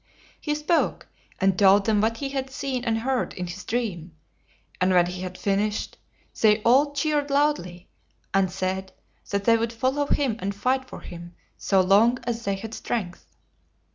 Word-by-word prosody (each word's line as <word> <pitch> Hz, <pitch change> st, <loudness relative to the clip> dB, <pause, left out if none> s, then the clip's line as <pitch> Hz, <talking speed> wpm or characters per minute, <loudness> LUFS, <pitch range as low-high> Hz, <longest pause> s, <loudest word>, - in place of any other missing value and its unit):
He 300 Hz, -1 st, -2 dB
spoke, 300 Hz, +3 st, 0 dB, 0.3 s
and 190 Hz, -1 st, +2 dB
told 195 Hz, 0 st, +6 dB
them 215 Hz, -2 st, +2 dB
what 225 Hz, +1 st, +1 dB
he 275 Hz, +2 st, -3 dB
had 270 Hz, -1 st, -3 dB
seen 265 Hz, -2 st, -3 dB
and 225 Hz, -1 st, +1 dB
heard 255 Hz, +2 st, -1 dB
in 180 Hz, -, -4 dB
his 180 Hz, +3 st, -7 dB
dream; 185 Hz, -9 st, -3 dB, 0.7 s
and 185 Hz, -, +3 dB
when 180 Hz, -1 st, +5 dB
he 180 Hz, +1 st, -5 dB
had 185 Hz, 0 st, -6 dB
fin 195 Hz, -1 st, 0 dB
ished, 210 Hz, 0 st, -2 dB, 0.5 s
they 215 Hz, -1 st, +5 dB
all 275 Hz, +5 st, +4 dB
cheered 290 Hz, 0 st, 0 dB
loudly, 275 Hz, -12 st, 0 dB, 0.5 s
and 195 Hz, -2 st, +2 dB
said 190 Hz, 0 st, -3 dB, 0.4 s
that 200 Hz, 0 st, -1 dB
they 230 Hz, +2 st, +5 dB
would 225 Hz, 0 st, -1 dB
follow 260 Hz, +5 st, 0 dB
him 265 Hz, -7 st, +1 dB
and 200 Hz, -1 st, -3 dB
fight 260 Hz, +5 st, 0 dB
for -, -, -9 dB
him 175 Hz, 0 st, -10 dB, 0.2 s
so 195 Hz, -2 st, +2 dB
long 210 Hz, +6 st, +4 dB
as 235 Hz, -1 st, -3 dB
they 200 Hz, 0 st, 0 dB
had 220 Hz, +3 st, -7 dB
strength. 195 Hz, -7 st, -4 dB
220 Hz, 175 wpm, -25 LUFS, 190-260 Hz, 0.7 s, told